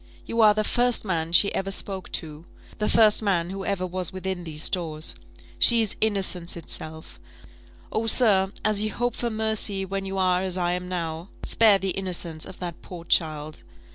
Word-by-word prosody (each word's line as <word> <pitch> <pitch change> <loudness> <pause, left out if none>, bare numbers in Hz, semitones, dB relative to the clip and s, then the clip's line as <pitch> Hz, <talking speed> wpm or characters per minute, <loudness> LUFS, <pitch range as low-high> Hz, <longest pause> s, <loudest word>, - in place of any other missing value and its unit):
You 230 - 0
are 210 -1 +6
the 215 - +1
first 245 +1 +1
man 165 -4 -1
she 200 +4 +5
ever 195 - -2
spoke 195 -1 -4
to; 155 -1 -4 0.4
the 210 - 0
first 220 -2 +5
man 180 -4 0
who 195 0 -5
ever 195 -2 -1
was 180 -1 -3
within 185 -1 -4
these 155 -1 -3
doors. 160 - -3 0.5
She 235 -1 +6
is 215 -2 0
innocence 190 -5 0
itself! 160 -1 -7 0.7
Oh, 225 +1 -1
sir, 200 -5 +4
as 215 -1 +3
you 215 0 -1
hope 245 0 -1
for 240 - -2
mercy 220 -3 0
when 195 +1 -4
you 195 0 -4
are 185 -1 +2
as 185 -1 -2
I 175 -1 0
am 180 0 -3
now, 165 0 -4
spare 220 -3 +5
the 195 -1 -2
innocence 175 -4 -3
of - - -10
that 175 -2 -6
poor 175 -2 -10
child! 155 -2 0
190 Hz, 185 wpm, -25 LUFS, 170-210 Hz, 0.7 s, are